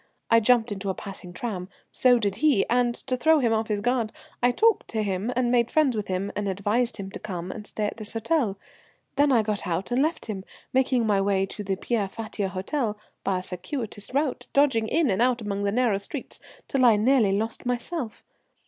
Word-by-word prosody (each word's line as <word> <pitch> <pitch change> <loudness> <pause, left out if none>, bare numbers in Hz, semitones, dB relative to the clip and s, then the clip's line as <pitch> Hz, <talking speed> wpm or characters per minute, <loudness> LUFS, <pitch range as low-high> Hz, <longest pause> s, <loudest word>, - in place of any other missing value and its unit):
I 230 - +7
jumped 230 0 +3
into 200 -1 -3
a 190 - -1
passing 195 -3 -8
tram, 185 -2 -4 0.2
so 250 -1 +4
did 200 -4 -1
he, 265 -6 +3
and 240 0 +2
to 255 - 0
throw 315 +5 +4
him 240 -6 +2
off 220 0 0
his 210 -2 -1
guard 240 -1 0 0.3
I 245 - +5
talked 445 - +3
to 220 -1 -1
him, 200 +3 -1
and 245 -1 +1
made 235 -2 +3
friends 295 -6 +3
with 210 -1 -3
him, 190 +2 -2
and 205 -1 -1
advised 210 +6 0
him 195 -2 -6
to - - -7
come 185 -3 -5
and 210 -2 -8
stay 215 - -2
at 205 - -3
this 215 -1 -5
hotel. 225 -3 0 0.6
Then 285 0 +4
I 235 -4 +4
got 210 -2 -2
out 180 +6 -2
and 250 +2 +2
left 315 +3 0
him, 200 -4 -5 0.3
making 255 -2 +2
my 205 -2 +2
way 195 -1 +2
to 210 +2 -7
the 195 -1 -1
Pierre 205 0 -1
Fatio 210 -2 -4
Hôtel 210 +4 -2 0.3
by 195 -1 +1
a 180 - -4
circuitous 205 +4 -4
route, 265 -2 -1
dodging 265 -6 +3
in 305 -1 +2
and 190 - +1
out 250 0 +3
among 200 -2 -2
the 200 - +1
narrow 225 -3 +2
streets 245 +7 -7 0.3
till 270 -2 +1
I 235 -3 +7
nearly 220 -2 +3
lost 225 +3 -3
myself. 245 0 -3
220 Hz, 215 wpm, -26 LUFS, 200-250 Hz, 0.6 s, I